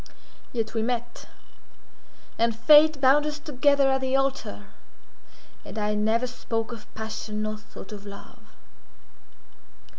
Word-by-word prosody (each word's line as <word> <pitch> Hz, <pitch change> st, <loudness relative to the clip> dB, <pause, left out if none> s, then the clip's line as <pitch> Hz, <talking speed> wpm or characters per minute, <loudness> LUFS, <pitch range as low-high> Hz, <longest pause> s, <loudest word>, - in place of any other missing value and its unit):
Yet 225 Hz, -2 st, -3 dB
we 225 Hz, -, 0 dB
met; 240 Hz, +1 st, -3 dB, 1.1 s
and 230 Hz, 0 st, +2 dB
fate 300 Hz, +5 st, +6 dB
bound 280 Hz, +3 st, +4 dB
us 300 Hz, 0 st, -3 dB
together 285 Hz, -2 st, +2 dB
at 265 Hz, 0 st, +1 dB
the 260 Hz, 0 st, 0 dB
altar; 270 Hz, -, -1 dB, 1.0 s
and -, -, -9 dB
I 210 Hz, 0 st, 0 dB
never 220 Hz, +3 st, +1 dB
spoke 225 Hz, -2 st, -4 dB
of 230 Hz, -3 st, -10 dB
passion 215 Hz, -1 st, -4 dB
nor 215 Hz, 0 st, -3 dB
thought 210 Hz, -1 st, -12 dB
of 205 Hz, -1 st, -8 dB
love. 200 Hz, -1 st, -13 dB
235 Hz, 125 wpm, -26 LUFS, 215-270 Hz, 1.1 s, fate